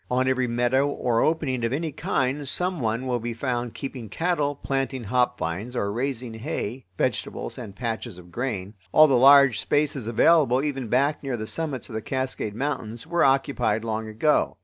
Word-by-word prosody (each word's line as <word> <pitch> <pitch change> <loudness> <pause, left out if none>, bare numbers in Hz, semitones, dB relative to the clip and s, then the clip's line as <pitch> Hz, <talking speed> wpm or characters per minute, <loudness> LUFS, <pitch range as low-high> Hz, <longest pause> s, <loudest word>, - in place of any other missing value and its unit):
On 130 +1 +1
every 130 -1 +1
meadow 120 +4 +2
or 120 -5 0
opening 145 -6 0
of 115 - 0
any 155 +4 -2
kind 135 +1 -1
some 180 +2 0
one 115 +1 -1
will 125 -2 0
be 120 0 -4
found 120 -1 -2
keeping 130 -5 -6
cattle, 150 - 0
planting 135 -2 -2
hop 125 +3 +1
vines, 95 +10 -4
or 100 -4 -1
raising 125 -1 -3
hay, 125 - -5
vegetables, - - -2
and 100 - -8
patches 115 -2 -4
of 90 -1 -14
grain. 105 -5 -3 0.2
All 155 - +8
the 140 - +2
large 135 -1 +7
spaces 145 -5 0
available, 135 +1 +4
even 135 -5 -2
back 140 +6 +1
near 135 -3 -3
the 110 - -4
summits 145 +1 -3
of 120 - -10
the 110 - -3
Cascade 130 -5 -3
Mountains, 120 -3 -3
were 170 +1 +1
occupied 130 -5 +2
long 110 -1 -3
ago. 110 +8 +1
125 Hz, 180 wpm, -25 LUFS, 115-140 Hz, 0.2 s, All